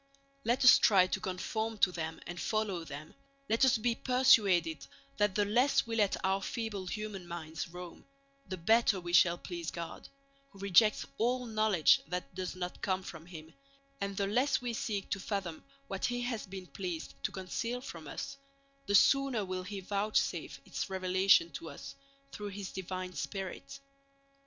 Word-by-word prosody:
Let 240 +2 +1
us 250 - +10
try 195 -4 +6
to 185 - -2
conform 220 +3 -3
to 195 - +4
them 160 -2 -4
and 175 0 -6
follow 210 -6 -1
them, 150 0 -8
and - - -21 0.4
let 225 - +3
us 260 -3 +5
be 235 +2 +1
persuaded 200 - +3 0.3
that 205 -2 +2
the 205 - +3
less 245 +7 +3
we 230 -1 -3
let 205 -3 +2
our 190 +1 +1
feeble 210 -4 -4
human 210 -2 -5
minds 165 -1 -5
roam, 175 0 -10 0.4
the 185 0 -4
better 220 +3 +3
we 175 -1 -6
shall 175 -1 +6
please 170 -2 -5
God, 170 -1 -7 0.4
who 200 - -17
rejects 200 +2 +4
all 250 +3 +1
knowledge 215 -7 +4
that 180 -3 -4
does 185 -1 -4
not 180 -1 -5
come 190 -1 0
from 170 -2 -9
Him; 160 -2 -10 0.5
and 200 -1 -3
the 200 - +1
less 245 +8 +2
we 245 -1 -3
seek 205 -3 -2
to 200 - 0
fathom 190 -5 -4 0.2
what 195 -1 -2
He 245 0 -1
has 240 -4 -3
been 190 -1 -7
pleased 180 -3 -5
to - - -1
conceal 230 +6 -3
from 165 - -9
us, 275 - -6 0.5
the 205 - +2
sooner 270 -4 +4
will 185 0 -3
He 195 +1 -6
vouchsafe 205 +3 -1
its - - -4
revelation 185 -2 +3
to 160 +3 -7
us 140 -1 -9 0.4
through 210 - -6
His 200 -1 -6
divine 185 0 -5
Spirit. 185 -10 -5
195 Hz, 170 wpm, -32 LUFS, 175-220 Hz, 0.5 s, us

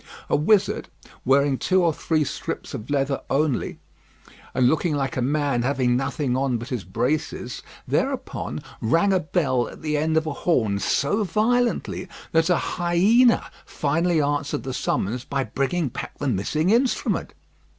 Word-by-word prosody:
A - - +5
wizard, 190 +7 +2 0.4
wearing 140 0 +3
two 185 -1 +2
or 165 -2 +3
three 155 0 0
strips 140 - -5
of 120 -2 -6
leather 140 -1 0
only, 145 -2 0 0.8
and 125 - +4
looking 155 +2 +1
like 140 +2 -2
a 130 - -1
man 140 -1 +1
having 125 -1 +1
nothing 135 0 -1
on 130 -2 +1
but 120 +3 -7
his 125 -7 -3
braces, 125 - -2 0.3
thereupon - - -2 0.2
rang 170 - +3
a 190 - +3
bell 145 -7 0
at - - -13
the 150 -1 0
end 160 +1 +1
of 160 - +2
a 155 - -2
horn 110 - +1
so 150 - +1
violently, 235 +5 0 0.2
that 165 +2 +3
a 180 - +4
hyena 195 +8 +3
finally 165 +3 0
answered 145 -1 -1
the 130 -1 -4
summons 120 +1 -1
by 135 +1 -1
bringing 140 +4 -1
back - - -7
the 145 - -3
missing 145 - 0
instrument. 245 +3 +1
145 Hz, 155 wpm, -24 LUFS, 130-170 Hz, 0.8 s, A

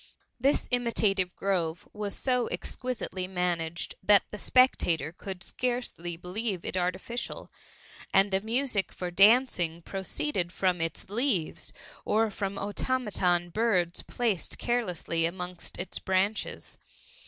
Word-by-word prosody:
This 275 +4 +2
imitative 210 -6 +1
grove 175 -4 -1
was 210 -1 -3
so 250 -2 +1
exquisitely 245 -7 -4
managed, 175 -3 -1
that 200 +1 +6
the 210 - -6
spectator 170 - +3
could 185 0 -7
scarcely 240 -9 -2
believe 185 +1 -3
it - - -3
artificial; 185 +6 -2 0.6
and 195 +1 +5
the 190 0 +2
music 225 -2 +1
for 180 -1 -4
dancing 185 -5 +4
proceeded 190 - -2
from 180 -2 +1
its 165 +3 -4
leaves, 220 - 0 0.3
or 220 0 +2
from 195 0 -3
automaton 200 -5 0
birds 185 -5 +1
placed 220 -9 -1
carelessly 180 -8 0
amongst 180 0 -6
its 180 - -3
branches. 190 +3 -1
195 Hz, 115 wpm, -29 LUFS, 175-230 Hz, 0.6 s, that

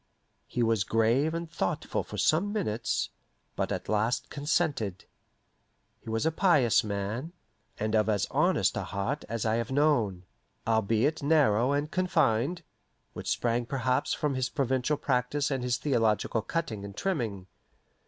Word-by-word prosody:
He 120 - -1
was 115 -3 +2
grave 115 +10 +2
and 170 0 -3
thoughtful 160 -11 -2
for - - -8
some 180 +7 +2
minutes, 120 - -1 0.4
but - - -1
at - - -3
last 110 +3 0
consented. 140 - -1 0.9
He - - -10
was 115 +5 -1
a 160 - +3
pious 150 - +4
man, 105 - -3 0.5
and 110 +1 -1
of 110 0 +3
as 105 -3 +2
honest - - +2
a - - -1
heart 115 +10 -3
as 115 -1 -2
I 110 +1 +2
have 115 -1 -2
known, 120 -11 +2 0.4
albeit 115 +7 +1
narrow 140 -5 +3
and 145 +1 -1
confined, 170 -3 +1 0.5
which - - -5
sprang 120 0 0
perhaps 130 -1 0
from 150 -2 0
his 130 -1 -1
provincial 130 +1 0
practice 135 +3 0
and 135 -2 -1
his 125 -1 +1
theological 115 -5 +1
cutting 110 -6 -3
and 100 0 -9
trimming. 115 - -2
125 Hz, 145 wpm, -29 LUFS, 110-150 Hz, 0.9 s, pious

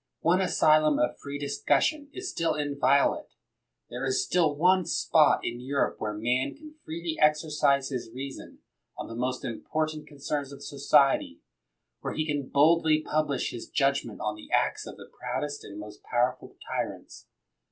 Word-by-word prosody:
One 180 +3 +3
asylum 155 -4 +4
of 120 - 0
free 140 0 -6
discussion 145 - 0
is 375 +4 -6
still 165 -2 0
inviolate. 140 -2 +1 0.6
There 125 +2 -5
is 130 -1 +1
still 165 -5 +2
one 180 +4 +4
spot 155 -2 +3
in 120 0 -3
Europe 140 +3 -1
where 105 - -2
man 120 +4 0
can 305 +1 -13
freely 165 0 -4
exercise 150 -3 +3
his 125 -4 -4
reason 135 +2 -8 0.3
on - - -5
the - - -8
most 125 +2 -2
important 155 +5 -3
concerns 145 -1 -4
of 140 - -10
society, 140 -1 +2 0.6
where - - -4
he 155 - 0
can 145 -3 -2
boldly 155 +1 +4
publish 155 -3 -1
his 120 - -8
judgment 135 -5 0
on 105 - -1
the 105 - -13
acts - - +1
of - - -9
the - - -11
proudest 145 -1 -5
and 100 - -9
most 105 0 -10
powerful 125 +1 -1
tyrants. - - -5
145 Hz, 155 wpm, -28 LUFS, 130-155 Hz, 0.6 s, asylum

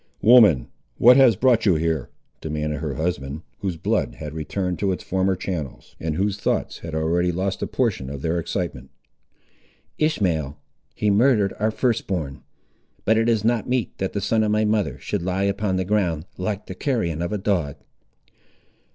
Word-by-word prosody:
"Woman, 105 - +6 0.3
what 125 +2 +7
has 130 -4 +6
brought 120 -4 +3
you 95 - +5
here?" 80 -4 -1 0.3
demanded 75 -1 -3
her 75 -3 -3
husband, 80 -2 -3 0.2
whose 95 -4 -3
blood - - -1
had 75 -1 -7
returned 90 +3 -3
into 100 -2 +2
its 90 - -4
former 95 0 0
channels, 85 -7 -6
and 80 -1 -2
whose 100 +3 -1
thoughts - - -1
had 80 -2 -6
already 85 +3 +1
lost 95 +2 -2
a - - -1
portion 105 - -1
of 70 0 -7
their 85 +1 0
excitement. 85 -7 -4 1.1
"Ishmael, 85 - 0 0.4
he 105 - +1
murdered 105 -2 +3
our 110 +2 +2
first 115 +1 0
born; 80 -9 -3 0.6
but 110 - +4
it 115 +1 +2
is 110 -3 +2
not 120 -1 +1
meet 125 -2 -1
that 95 - -2
the 100 - -2
son 110 +3 +1
of 110 - +1
my 105 +1 +2
mother 105 -1 0
should 105 - -3
lie 95 +2 -1
upon 100 -1 0
the 95 0 -1
ground, 90 -6 0
like 100 +2 -3
the - - -7
carrion 90 - -1
of 85 - -2
a 105 - 0
dog!" 90 -8 -1
95 Hz, 175 wpm, -23 LUFS, 80-105 Hz, 1.1 s, what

